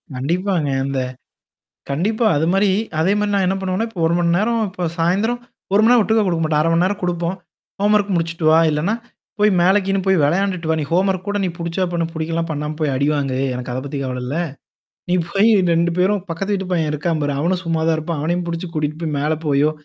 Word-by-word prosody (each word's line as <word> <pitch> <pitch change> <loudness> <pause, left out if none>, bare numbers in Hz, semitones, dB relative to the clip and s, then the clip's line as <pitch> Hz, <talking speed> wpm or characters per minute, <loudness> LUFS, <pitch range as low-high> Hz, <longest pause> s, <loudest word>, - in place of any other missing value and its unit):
கண்டிப்பாங்க. 170 +3 -1 0.2
அந்த. 135 -1 -1 0.9
கண்டிப்பா. 215 - 0
அது 160 +3 +1
மாரி 195 0 +3 0.3
அதே 180 +5 +3
மாரி 210 0 0
நான் 195 -2 +2
என்ன 190 +1 +1
பண்ணுவேன்னா, 190 +4 -1
இப்ப 185 - -7
1 170 - +2
மணி 170 -1 +2
நேரம் 225 +1 +1
இப்ப 180 -2 -3
சாயந்திரம் 200 +9 +1 0.3
1 200 - +5
மணி 225 - +5
நேரம் 245 -3 +6
ஒட்டுக்கா 220 +1 +2
குடுக்க 170 -3 0
மாட்டேன். 155 -1 +1
1/2 165 - +1
மணி 170 +2 +3
நேரம் 200 +1 -1
குடுப்போம். 175 +1 -1 0.4
ஹோம்வொர்க் 205 0 +2
முடிச்சுட்டு 165 0 -2
வா, 160 - +6
இல்லன்னா 155 +8 0 0.5
போய் 210 0 +5
மேலை 190 +4 +5
கீன்னு 195 0 +1
போய் 190 -4 +3
வெளையாண்டுட்டு 180 +1 0
வா. - - +3
நீ 150 - -1
ஹோம்வொர்க் 185 +1 +1
கூட 205 0 0
நீ - - 0
புடிச்சா 170 +2 -1
பண்ணு, 170 -1 0
புடிக்கலனா 165 +1 -2
பண்ணாம 150 0 -3
போய் 150 -3 +1
அடிவாங்கு. 140 -2 0 0.2
எனக்கு 125 0 -5
அத 130 - -2
பத்தி 140 0 -5
கவல 125 -1 -4
இல்ல. 135 +5 -3 0.7
நீ - - +2 0.2
போய் 205 +5 +3 0.2
2 170 +1 +2
பேரும் 195 +1 +2
பக்கத்து 195 +5 -2
வீட்டுப்பய்யன் 185 -4 -1
என்ன 150 - -2
இருக்கா 165 +3 -1
பாரு. 145 0 0
அவனும் 175 +4 0
சும்மா 165 -1 0
தான் 165 - +3
இருப்பான். 160 0 -3
அவனையும் 175 +3 -1
புடிச்சு 170 +2 -4
கூட்டிட்டு 155 0 -2
போய் 155 -2 -2
மேல 150 +2 0
போயோ, 145 +1 +3
170 Hz, 210 wpm, -20 LUFS, 155-195 Hz, 0.9 s, நேரம்